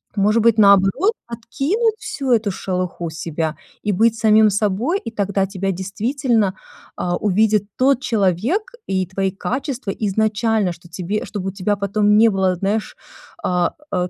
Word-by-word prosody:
Может 210 Hz, +2 st, +2 dB
быть, 230 Hz, -1 st, +4 dB
наоборот, 200 Hz, -, +5 dB
откинуть 285 Hz, -, -1 dB
всю 270 Hz, -9 st, -3 dB
эту 220 Hz, -3 st, +2 dB
шелуху 180 Hz, -2 st, -3 dB
себя 160 Hz, 0 st, -4 dB, 0.3 s
и 210 Hz, -, 0 dB
быть 225 Hz, +4 st, +3 dB
самим 215 Hz, -1 st, +5 dB
собой, 215 Hz, -, 0 dB
и 230 Hz, -, -6 dB
тогда 200 Hz, -2 st, -1 dB
тебя 195 Hz, 0 st, -2 dB
действительно, 210 Hz, +2 st, -1 dB, 0.4 s
а, 175 Hz, 0 st, -1 dB
увидит 210 Hz, +1 st, +2 dB
тот 265 Hz, 0 st, +3 dB
человек 225 Hz, -, +1 dB, 0.3 s
и 185 Hz, -1 st, -1 dB
твои 190 Hz, 0 st, -1 dB
качества 255 Hz, +2 st, -4 dB
изначально, 215 Hz, 0 st, 0 dB
что 170 Hz, +1 st, -17 dB
тебе 190 Hz, +4 st, -3 dB
чтобы 195 Hz, -3 st, -5 dB
у -, -, -5 dB
тебя 195 Hz, +2 st, -1 dB
потом 205 Hz, +1 st, +2 dB
не 225 Hz, +1 st, +6 dB
было, 190 Hz, -2 st, +1 dB
знаешь, 200 Hz, +4 st, -2 dB, 0.5 s
а, 180 Hz, -1 st, +1 dB, 0.2 s
э, 180 Hz, -1 st, 0 dB
205 Hz, 150 wpm, -20 LUFS, 190-230 Hz, 0.5 s, не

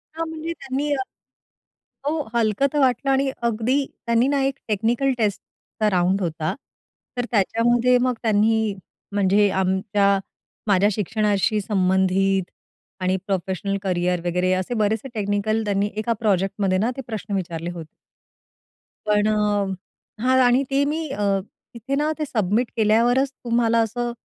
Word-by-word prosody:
हां, 330 Hz, 0 st, -3 dB
म्हणजे 320 Hz, +1 st, -5 dB
त्यांनी 280 Hz, +3 st, -2 dB
अ 265 Hz, -, -1 dB, 1.1 s
हो, -, -, +2 dB, 0.2 s
हलकं 230 Hz, +4 st, +2 dB
तर 295 Hz, -, +1 dB
वाटलं 265 Hz, 0 st, +2 dB
आणि 270 Hz, 0 st, +2 dB, 0.2 s
अगदी 245 Hz, +5 st, 0 dB, 0.2 s
त्यांनी 235 Hz, +2 st, +3 dB
ना 280 Hz, -1 st, +1 dB
एक 270 Hz, 0 st, 0 dB
टेक्निकल 230 Hz, +6 st, +1 dB
टेस्टचा 215 Hz, 0 st, -2 dB
राउंड 185 Hz, +1 st, +1 dB
होता, 160 Hz, -2 st, -2 dB, 0.6 s
तर 245 Hz, -, 0 dB
त्याच्यामध्ये 240 Hz, +4 st, +3 dB
मग 255 Hz, 0 st, +2 dB
त्यांनी 220 Hz, -1 st, +2 dB, 0.4 s
म्हणजे 200 Hz, 0 st, +3 dB
आमच्या 195 Hz, +1 st, +1 dB, 0.5 s
माझ्या 200 Hz, +1 st, +4 dB
शिक्षणाशी 210 Hz, +1 st, 0 dB
संबंधित 190 Hz, -1 st, +1 dB, 0.5 s
आणि 185 Hz, +1 st, +1 dB
प्रोफेशनल 195 Hz, +1 st, -2 dB
करियर 180 Hz, -1 st, 0 dB
वगैरे 180 Hz, +1 st, +1 dB
असे 185 Hz, +6 st, -2 dB
बरेचसे 220 Hz, +3 st, 0 dB
टेक्निकल 210 Hz, +1 st, 0 dB
त्यांनी 200 Hz, 0 st, 0 dB
एका 230 Hz, +2 st, 0 dB
प्रोजेक्टमध्ये 195 Hz, -2 st, +1 dB
ना 225 Hz, +6 st, +1 dB
ते -, -, -3 dB
प्रश्न 215 Hz, -2 st, -5 dB
विचारले 170 Hz, -2 st, -3 dB
होते. 165 Hz, -3 st, -8 dB, 1.2 s
पण 210 Hz, 0 st, +2 dB
अ, 205 Hz, -2 st, +1 dB, 0.5 s
हां 260 Hz, +1 st, +4 dB
आणि 250 Hz, +3 st, +4 dB
ते 275 Hz, +1 st, +2 dB
मी 310 Hz, +2 st, -2 dB
अ, 270 Hz, -, -5 dB, 0.5 s
तिथे 250 Hz, +4 st, -3 dB
ना 300 Hz, +2 st, +1 dB
ते 305 Hz, -, 0 dB
सबमिट 220 Hz, 0 st, 0 dB
केल्यावरच 240 Hz, +5 st, +3 dB
तुम्हाला 235 Hz, -2 st, +1 dB
असं 240 Hz, +2 st, -2 dB
215 Hz, 135 wpm, -22 LUFS, 195-245 Hz, 1.2 s, माझ्या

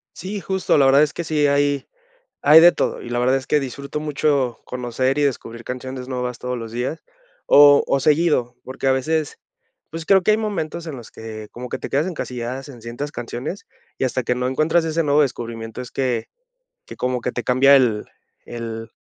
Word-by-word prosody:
Sí, 195 Hz, +4 st, -5 dB
justo 190 Hz, 0 st, 0 dB
la 140 Hz, -, +5 dB
verdad 135 Hz, +2 st, +6 dB
es 150 Hz, -2 st, 0 dB
que 170 Hz, -, -4 dB
sí 150 Hz, -2 st, +1 dB
hay 140 Hz, 0 st, +1 dB, 0.6 s
hay 155 Hz, +3 st, +8 dB
de 175 Hz, +1 st, +9 dB
todo, -, -, -2 dB
y -, -, -8 dB
la 120 Hz, -, -2 dB
verdad 130 Hz, +2 st, +3 dB
es 130 Hz, -, -4 dB
que 150 Hz, -, +3 dB
disfruto 140 Hz, +3 st, -5 dB
mucho 145 Hz, -5 st, 0 dB
conocer 125 Hz, +2 st, -2 dB
y 145 Hz, -, +2 dB
descubrir 115 Hz, -4 st, -3 dB
canciones 130 Hz, 0 st, -6 dB
nuevas 125 Hz, -2 st, -3 dB
todos 125 Hz, -1 st, -4 dB
los 115 Hz, -1 st, -7 dB
días, 125 Hz, +7 st, -3 dB, 0.4 s
o 145 Hz, 0 st, +7 dB
o 135 Hz, -, +1 dB
seguido, 150 Hz, -5 st, +2 dB
porque 130 Hz, +1 st, -5 dB
a -, -, +5 dB
veces, 155 Hz, +3 st, -1 dB, 0.5 s
pues, 165 Hz, 0 st, -6 dB
creo 190 Hz, 0 st, +5 dB
que 215 Hz, -, +4 dB
hay 215 Hz, -, +3 dB
momentos 170 Hz, -6 st, -3 dB
en 150 Hz, -, -5 dB
los 120 Hz, -3 st, -11 dB
que 110 Hz, -1 st, -9 dB
como 125 Hz, +1 st, -8 dB
que -, -, -3 dB
te -, -, -6 dB
quedas 145 Hz, +4 st, +1 dB
encasilladas 130 Hz, -5 st, -5 dB
en 125 Hz, -4 st, -12 dB
ciertas 130 Hz, +6 st, -5 dB
canciones, 125 Hz, +10 st, -6 dB, 0.3 s
y -, -, -2 dB
hasta 130 Hz, 0 st, -1 dB
que 125 Hz, -, 0 dB
no 125 Hz, 0 st, -1 dB
encuentras 155 Hz, +5 st, +1 dB
ese 165 Hz, +1 st, 0 dB
nuevo 150 Hz, 0 st, +3 dB
descubrimiento 115 Hz, -2 st, -5 dB
es 125 Hz, -, -9 dB
que 125 Hz, -4 st, -1 dB, 0.6 s
que -, -, -10 dB
como 125 Hz, -1 st, -1 dB
que 125 Hz, -, -2 dB
te 120 Hz, -, -4 dB
cambia 135 Hz, +3 st, +5 dB
el 115 Hz, -6 st, +2 dB, 0.4 s
el 115 Hz, -1 st, -6 dB
130 Hz, 205 wpm, -21 LUFS, 125-150 Hz, 0.6 s, de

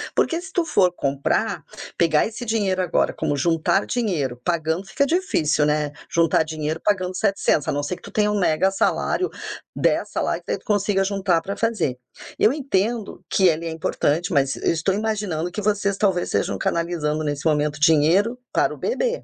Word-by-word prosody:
porque, 335 Hz, +1 st, +1 dB
se 380 Hz, +2 st, -10 dB
tu 350 Hz, -3 st, 0 dB
for 190 Hz, -, +3 dB
comprar, 140 Hz, -5 st, -1 dB, 0.3 s
pegar 160 Hz, -3 st, +3 dB
esse 225 Hz, +2 st, -7 dB
dinheiro 205 Hz, -5 st, 0 dB
agora, 180 Hz, -2 st, +1 dB
como 145 Hz, -, -1 dB
juntar 165 Hz, +6 st, +1 dB
dinheiro, 155 Hz, -, -2 dB
pagando 165 Hz, +1 st, -1 dB
fica 280 Hz, +8 st, 0 dB
difícil, 165 Hz, -, +1 dB
né, 150 Hz, -1 st, 0 dB, 0.2 s
juntar 165 Hz, -1 st, +3 dB
dinheiro 155 Hz, 0 st, -4 dB
pagando 185 Hz, -3 st, 0 dB
700, 195 Hz, -7 st, +1 dB
a -, -, +2 dB
não 145 Hz, 0 st, -2 dB
ser 145 Hz, -, -2 dB
que -, -, -18 dB
tu -, -, -11 dB
tenha 210 Hz, -1 st, +2 dB
um 210 Hz, -, 0 dB
mega 180 Hz, 0 st, +2 dB
salário, 285 Hz, -, 0 dB, 0.5 s
10 -, -, +1 dB
salários, -, -, -1 dB
que -, -, -5 dB
daí -, -, -1 dB
tu -, -, -29 dB
consiga 205 Hz, -2 st, +1 dB
juntar 190 Hz, -4 st, +1 dB
pra 200 Hz, +4 st, -5 dB
fazer. 210 Hz, -, -1 dB, 0.4 s
Eu 215 Hz, -, +4 dB
entendo 230 Hz, -8 st, -2 dB
que 190 Hz, -, +4 dB
ele 165 Hz, -1 st, +1 dB
é -, -, -3 dB
importante, 160 Hz, +2 st, -1 dB
mas 140 Hz, -2 st, +2 dB
eu -, -, +1 dB
estou 165 Hz, +4 st, 0 dB
imaginando 200 Hz, -6 st, -2 dB
que 210 Hz, -, -4 dB
vocês 200 Hz, -1 st, 0 dB
talvez 190 Hz, -3 st, +1 dB
estejam -, -, -1 dB
canalizando, 160 Hz, -3 st, -1 dB
nesse 145 Hz, -1 st, -3 dB
momento, 150 Hz, -1 st, +1 dB
dinheiro 165 Hz, +9 st, +4 dB
para -, -, +1 dB
o -, -, -10 dB
bebê. -, -, -1 dB
180 Hz, 185 wpm, -22 LUFS, 155-210 Hz, 0.5 s, Eu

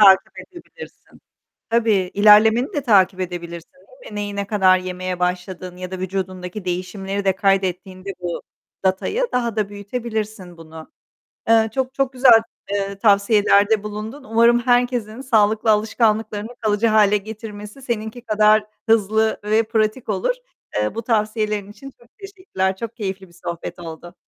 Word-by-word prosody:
takip 195 Hz, -2 st, +5 dB
edebilirsin. 370 Hz, +6 st, -14 dB, 0.5 s
Tabii, 220 Hz, -5 st, +2 dB
ilerlemeni 215 Hz, +4 st, +5 dB
de 290 Hz, -, -1 dB
takip 195 Hz, -6 st, +3 dB
edebilirsin 170 Hz, -2 st, -6 dB
değil -, -, -16 dB
mi? -, -, -10 dB
Neyi, 205 Hz, -1 st, -4 dB
ne 200 Hz, 0 st, -2 dB
kadar 190 Hz, -3 st, +4 dB
yemeye 185 Hz, 0 st, -5 dB
başladığın 180 Hz, 0 st, -3 dB
ya 180 Hz, 0 st, -7 dB
da 185 Hz, -, -5 dB
vücudundaki 185 Hz, +1 st, -5 dB
değişimleri 190 Hz, +2 st, -3 dB
de 190 Hz, -1 st, +1 dB
kaydettiğinde 190 Hz, -1 st, -1 dB
bu 175 Hz, -1 st, -4 dB, 0.4 s
datayı, 190 Hz, -, 0 dB
daha 235 Hz, -3 st, -1 dB
da 210 Hz, -2 st, 0 dB
büyütebilirsin 210 Hz, -3 st, -5 dB
bunu. 160 Hz, -1 st, -12 dB, 0.6 s
Eee, 225 Hz, -1 st, +5 dB
çok 265 Hz, -1 st, -2 dB
çok 275 Hz, -1 st, 0 dB
güzel 250 Hz, -3 st, +6 dB, 0.6 s
tavsiyelerde 205 Hz, 0 st, +4 dB
bulundun. 215 Hz, +6 st, -7 dB
Umarım 235 Hz, +1 st, +4 dB
herkesin 245 Hz, -2 st, 0 dB
sağlıklı 220 Hz, -4 st, +2 dB
alışkanlıklarını 215 Hz, 0 st, +1 dB
kalıcı 215 Hz, 0 st, +1 dB
hâle 210 Hz, -2 st, +4 dB
getirmesi, 210 Hz, +3 st, -8 dB
seninki 230 Hz, -1 st, -4 dB
kadar 215 Hz, -1 st, +3 dB, 0.2 s
hızlı 220 Hz, 0 st, +2 dB
ve 215 Hz, +2 st, +3 dB
pratik 220 Hz, +2 st, -1 dB
olur. 210 Hz, -, 0 dB, 0.4 s
Eee, 105 Hz, 0 st, 0 dB
bu 230 Hz, -, -4 dB
tavsiyelerin 215 Hz, -2 st, -1 dB
için 275 Hz, +6 st, -11 dB
çok 240 Hz, -, -21 dB
teşekkürler. 370 Hz, -, -3 dB
Çok 230 Hz, +3 st, -7 dB
keyifli 195 Hz, -3 st, -5 dB
bir 170 Hz, -, -22 dB
sohbet 170 Hz, +1 st, -5 dB
oldu. 170 Hz, +1 st, -9 dB
210 Hz, 140 wpm, -21 LUFS, 190-225 Hz, 0.6 s, güzel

